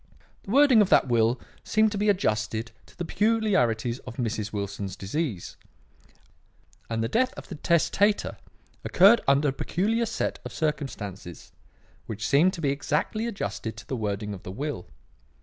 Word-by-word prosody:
The -, -, -14 dB
wording 265 Hz, -1 st, +6 dB
of 200 Hz, -, +2 dB
that -, -, +5 dB
will 120 Hz, +1 st, +2 dB, 0.2 s
seemed 215 Hz, 0 st, +2 dB
to 205 Hz, -, -3 dB
be 210 Hz, 0 st, +2 dB
adjusted 110 Hz, -, 0 dB, 0.2 s
to -, -, -20 dB
the 175 Hz, -, -3 dB
peculiarities 160 Hz, -, +1 dB
of 125 Hz, -, -10 dB
Mrs. 110 Hz, -3 st, -2 dB
Wilson's 100 Hz, -2 st, -4 dB
disease; 105 Hz, -, -4 dB, 1.3 s
and 115 Hz, -1 st, -1 dB
the -, -, 0 dB
death 255 Hz, -, +1 dB
of -, -, -10 dB
the -, -, -6 dB
testator 175 Hz, +6 st, +1 dB, 0.5 s
occurred 200 Hz, +6 st, +6 dB
under 140 Hz, +2 st, +4 dB
a -, -, -2 dB
peculiar 225 Hz, +11 st, 0 dB
set 230 Hz, -, -2 dB
of -, -, -8 dB
circumstances 115 Hz, -, -4 dB, 0.6 s
which 110 Hz, -1 st, -4 dB
seemed 170 Hz, +7 st, +4 dB
to 170 Hz, -, -6 dB
be 140 Hz, -3 st, +1 dB
exactly 150 Hz, +10 st, -1 dB
adjusted 110 Hz, -, -4 dB
to 105 Hz, -, -11 dB
the 130 Hz, -, -2 dB
wording 105 Hz, -2 st, -3 dB
of 95 Hz, -, -8 dB
the -, -, -9 dB
will. 140 Hz, -3 st, -4 dB
140 Hz, 160 wpm, -26 LUFS, -, 1.3 s, wording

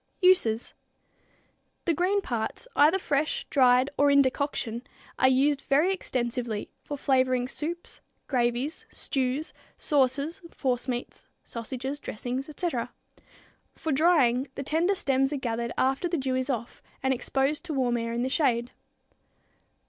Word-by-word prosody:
Uses. 240 Hz, -12 st, +4 dB, 1.1 s
The 335 Hz, -, +3 dB
green 370 Hz, +5 st, +1 dB
parts, 235 Hz, -, -3 dB
either 305 Hz, +6 st, +5 dB
fresh, 300 Hz, -4 st, -1 dB
dried 255 Hz, -1 st, +5 dB
or 285 Hz, 0 st, +5 dB
in 280 Hz, 0 st, +6 dB
decoction, 260 Hz, -3 st, -2 dB, 0.4 s
are 260 Hz, -, +6 dB
used 275 Hz, +2 st, +3 dB
very 305 Hz, +8 st, +3 dB
extensively 240 Hz, -, -3 dB
for 290 Hz, -, -5 dB
flavoring 255 Hz, -2 st, +2 dB
soups, 335 Hz, +6 st, -5 dB, 0.2 s
gravies, 245 Hz, +3 st, -1 dB
stews, 270 Hz, +3 st, -2 dB, 0.2 s
sauces, 280 Hz, +4 st, +1 dB
forcemeats, 250 Hz, -3 st, -3 dB, 0.2 s
sausages, 260 Hz, +4 st, -5 dB
dressings, 255 Hz, +3 st, -4 dB
etc. 300 Hz, -6 st, -2 dB, 0.8 s
For 320 Hz, -, -3 dB
drying, 275 Hz, -4 st, +3 dB
the 275 Hz, -, -4 dB
tender 330 Hz, +7 st, +1 dB
stems 270 Hz, -4 st, +1 dB
are -, -, -1 dB
gathered 235 Hz, -2 st, -2 dB
after 270 Hz, +7 st, +1 dB
the 340 Hz, -, 0 dB
dew 265 Hz, -2 st, -1 dB
is 260 Hz, +1 st, -1 dB
off 235 Hz, -3 st, -3 dB, 0.2 s
and 265 Hz, 0 st, +3 dB
exposed 270 Hz, +3 st, 0 dB
to 325 Hz, -, -3 dB
warm 250 Hz, -3 st, +1 dB
air 230 Hz, -1 st, -2 dB
in 235 Hz, +1 st, -1 dB
the -, -, 0 dB
shade. 245 Hz, -5 st, +1 dB
265 Hz, 135 wpm, -27 LUFS, 245-295 Hz, 1.1 s, in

